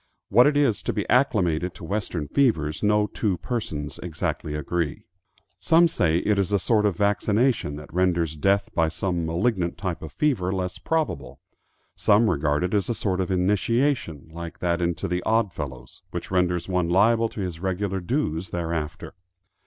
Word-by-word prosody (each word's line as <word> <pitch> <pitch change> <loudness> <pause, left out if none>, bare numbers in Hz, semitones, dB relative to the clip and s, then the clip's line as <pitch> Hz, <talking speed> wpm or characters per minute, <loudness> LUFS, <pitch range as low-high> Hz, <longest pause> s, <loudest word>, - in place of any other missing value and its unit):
What 120 +6 +6
it 145 -1 +2
is 125 -9 +2
to - - -2
be 105 - -2
acclimated 90 - +2
to - - -11
western 90 -4 -3
fevers 80 - +1
no 105 0 +3
two 105 -2 -1
persons 80 -13 -4
exactly 80 -2 -3
agree. 75 0 -2 0.5
Some 165 - +5
say 85 - +1
it 105 -1 +2
is 100 0 0
a 100 - +4
sort 105 +1 +2
of 95 -5 -2
vaccination 105 - +1
that 75 0 -10
renders 85 -3 +1
death 100 +5 +1
by 80 -1 +2
some 85 -1 -2
malignant 85 +1 0
type 90 -4 -3
of 80 - -7
fever 115 - 0
less 90 -1 -3
probable. 155 - -2 0.6
Some 105 +1 +4
regard 75 0 0
it 90 - -1
as 100 0 +1
a 120 - 0
sort 95 -3 -1
of 90 - -2
initiation, 100 - 0
like 85 0 -7
that 85 0 0
into 85 +1 -1
the 90 +1 -1
Odd 110 -3 +1
Fellows, 65 -4 -7
which - - -6
renders 90 -2 +1
one 90 -3 0
liable 115 +5 +3
to - - -9
his 90 -4 -4
regular 95 +1 -2
dues 90 - -2
thereafter. 85 +1 -4
90 Hz, 170 wpm, -25 LUFS, 85-105 Hz, 0.6 s, What